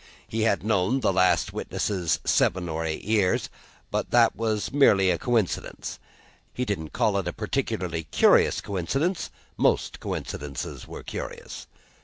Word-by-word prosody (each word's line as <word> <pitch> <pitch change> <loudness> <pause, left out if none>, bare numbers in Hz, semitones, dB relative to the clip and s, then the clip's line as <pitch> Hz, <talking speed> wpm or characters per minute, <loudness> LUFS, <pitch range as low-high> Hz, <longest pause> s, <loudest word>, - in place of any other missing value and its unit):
He 110 - -2
had 110 -3 +2
known 110 +4 +1
the 95 - +2
last 95 0 +3
witness 90 -6 -1
seven 90 0 +2
or 80 0 -2
eight 80 -1 -3
years; 105 -3 +1 0.4
that 120 -1 +3
was 110 +1 -1
merely 100 -10 +5
a 85 - -1
coincidence. 115 -7 -1 0.6
He 125 - -1
didn't 85 -8 -3
call 100 -2 +1
it 95 - -4
a 90 - -2
particularly 105 - -2
curious - - +4
coincidence; 135 - -1 0.3
most - - +1
coincidences 70 -1 -5
were - - -8
curious. - - -7
100 Hz, 135 wpm, -26 LUFS, 90-115 Hz, 0.6 s, merely